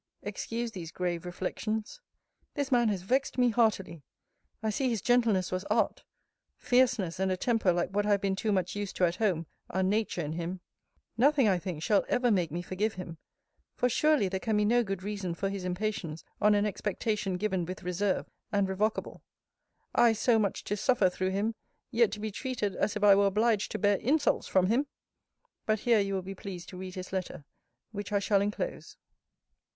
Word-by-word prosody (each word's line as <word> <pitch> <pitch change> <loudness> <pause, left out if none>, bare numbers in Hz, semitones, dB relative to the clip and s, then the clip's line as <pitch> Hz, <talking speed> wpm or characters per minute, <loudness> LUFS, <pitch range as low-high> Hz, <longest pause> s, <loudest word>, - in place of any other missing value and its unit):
Excuse 230 +3 -3
these 170 -5 -7
grave 180 -1 -3
reflections. 215 - -4 0.5
This 285 -3 -2
man 240 -3 +4
has 195 -4 -2
vexed 265 +7 0
me 250 -1 +4
heartily. 215 -8 +1 0.6
I 220 - +1
see 260 +5 0
his 230 -3 0
gentleness 225 -5 +2
was 185 +1 -2
art: - - 0 0.5
fierceness, 245 -9 +2
and 190 0 +1
a 185 - 0
temper 225 -3 +2
like 175 +1 -1
what 205 +1 0
I - - +1
have 200 -1 +3
been 195 -1 0
too 215 +2 -1
much 185 -2 0
used 205 -1 -4
to 180 - +3
at 170 +1 -1
home, 185 -7 +1 0.2
are 190 +1 0
Nature 205 -1 0
in 150 -2 -3
him. 175 +2 -4 0.6
Nothing, 275 0 +4
I 190 -3 +3
think, 170 -4 -5
shall 205 +2 +3
ever 245 -1 +2
make 180 -5 +2
me 175 +2 -3
forgive 205 +4 -2
him; 170 -3 -7 0.6
for, 250 - +1
surely, 300 -3 +3
there 190 0 -2
can 220 +1 0
be 210 - +3
no 240 +3 +4
good 195 -3 -4
reason 200 -4 -3
for 195 +3 -2
his 195 -1 -4
impatience 180 -3 -3 0.2
on 210 0 +5
an 205 0 +2
expectation 205 -1 -2
given 190 -2 -1
with 185 +2 -6
reserve, 185 +2 -1 0.2
and 200 -2 +2
revocable. 210 +3 -2 0.7
I 235 -1 +5
so 225 +1 +3
much 200 -3 -1
to 205 - -2
suffer 210 -5 +3
through 185 +1 -1
him; 205 +4 0 0.4
yet, 235 -3 +3
to 210 - -5
be 215 0 -3
treated 215 -4 -3
as 215 - 0
if 210 - -3
I 205 -1 +8
were 200 0 +4
obliged 215 +1 +2
to - - -1
bear 205 -1 +3
insults 290 +7 +1
from 185 -1 +3
him! 240 +9 +1 0.8
But 215 -1 +1
here 235 -3 +4
you 195 -1 0
will 190 - -2
be 195 +2 -6
pleased 185 -2 -8
to 185 - -9
read 185 0 -7
his 185 0 -7
letter; 185 -6 -4 0.5
which 205 -1 -6
I 205 - +3
shall 200 0 +2
enclose. 210 - -4
200 Hz, 200 wpm, -30 LUFS, 185-220 Hz, 0.8 s, I